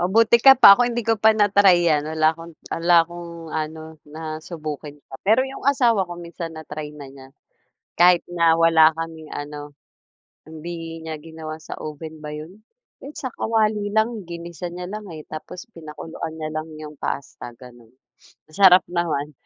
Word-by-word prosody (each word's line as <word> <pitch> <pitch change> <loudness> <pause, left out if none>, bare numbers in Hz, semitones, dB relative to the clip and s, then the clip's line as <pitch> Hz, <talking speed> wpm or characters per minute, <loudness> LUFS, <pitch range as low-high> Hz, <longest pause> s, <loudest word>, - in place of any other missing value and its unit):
Mabuti 220 +6 +4
ka 270 - +10
pa, 200 -5 +10
ako, - - -3
hindi 240 0 -2
ko 225 - +3
pa 220 +1 +5
na-try 195 -4 +4
yan. 150 -1 +2
Wala 155 0 +2
akong 165 +1 -11 0.2
wala 170 +1 +2
akong 175 0 -9 0.2
ano, 155 0 -4 0.2
nasubukan 155 -1 -7
pa. 135 - -11
Pero 220 +5 +4
'yong 265 -1 -9
asawa 240 -9 +3
ko 175 - -7
minsan 170 -1 -7
na-try 150 -1 -7
na 145 -2 -10
niya. 135 -1 -14 0.7
Kahit 175 0 +5
na 170 -2 +3
wala 165 -1 +5
kaming 160 -1 -7
ano, 145 0 -7 0.7
hindi 165 +1 -8
niya 160 -1 -6
ginawa 160 0 -8
sa - - -8
oven 155 +1 -8
ba 150 - -6
'yun? 165 +8 -10 0.4
Kahit 285 +2 -11
sa 260 -5 -4
kawali 215 -2 0
lang. 220 -2 0
Ginisa 170 +1 -7
niya 180 +1 -7
lang 210 0 -7
eh, 155 -3 -9
tapos 175 +3 -9
pinakuluan 160 -1 -8
niya 155 -1 -5
lang 155 +1 -4
'yong 150 -1 -10
pasta, 135 -3 -5
gano'n. 120 -2 -15 0.6
Masarap 180 +2 +6
naman. 155 -4 -2
165 Hz, 165 wpm, -22 LUFS, 155-185 Hz, 0.7 s, ka